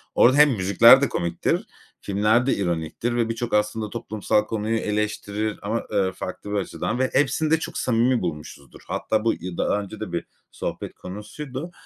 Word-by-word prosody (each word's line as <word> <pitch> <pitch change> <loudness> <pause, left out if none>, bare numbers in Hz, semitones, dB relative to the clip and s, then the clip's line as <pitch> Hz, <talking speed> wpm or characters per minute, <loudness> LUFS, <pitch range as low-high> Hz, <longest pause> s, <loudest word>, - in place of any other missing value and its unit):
Orada 130 +4 +5
hem 150 0 +7
müzikler 115 +5 +6
de 140 - +2
komiktir, 85 -1 -1 0.4
filmler 105 +4 +2
de 135 - +2
ironiktir 85 +5 -2
ve 115 -1 +1
birçok 115 +1 -3
aslında 105 +1 0
toplumsal 110 -2 -1
konuyu 110 +1 -1
eleştirir 105 0 -2
ama, 110 +3 -2
eee, 95 -3 +1
farklı 105 - -7
bir - - -1
açıdan 105 +4 -2
ve 130 - +2
hepsini 145 +3 +2
de 160 - +4
çok - - -5
samimi 120 +1 +2
bulmuşuzdur. 75 -5 -7
Hatta 110 0 -1
bu 115 - +3
yı 90 -1 -7
daha 105 - +1
önce 105 +2 -9
de 105 -5 -5
bir 85 - -3 0.3
sohbet - - -5
konusuydu. 130 - -7
110 Hz, 170 wpm, -24 LUFS, 100-120 Hz, 0.4 s, hem